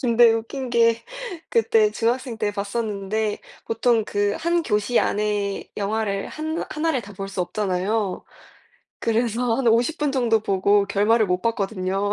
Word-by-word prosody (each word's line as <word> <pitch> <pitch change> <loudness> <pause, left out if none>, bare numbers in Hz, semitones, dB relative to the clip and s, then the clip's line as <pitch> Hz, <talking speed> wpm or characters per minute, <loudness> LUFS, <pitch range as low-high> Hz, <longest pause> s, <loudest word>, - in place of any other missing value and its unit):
근데 235 -2 +5
웃긴 245 +4 -3
게 230 -1 +3 0.5
그때 455 -2 +3
중학생 245 +1 -1
때 210 -1 0
봤었는데 205 0 -2 0.3
보통 225 -1 +1
그 205 -1 0
1 340 +1 +1
교시 210 -1 +1
안에 205 -1 -1
영화를 200 -1 -1
한나 315 +2 -4
하나를 305 -3 0
다 205 0 -11
볼 195 +1 -5
수 195 -1 -4
없잖아요. 195 +2 -1 0.7
그래서 230 +1 0
한 255 -3 +2
50 240 +8 +2
분 295 -1 +1
정도 235 -4 +2
보고 200 0 +2
결말을 210 +2 +3
못 180 0 0
봤거든요. 200 -2 -1
220 Hz, 265 characters per minute, -23 LUFS, 200-240 Hz, 0.7 s, 근데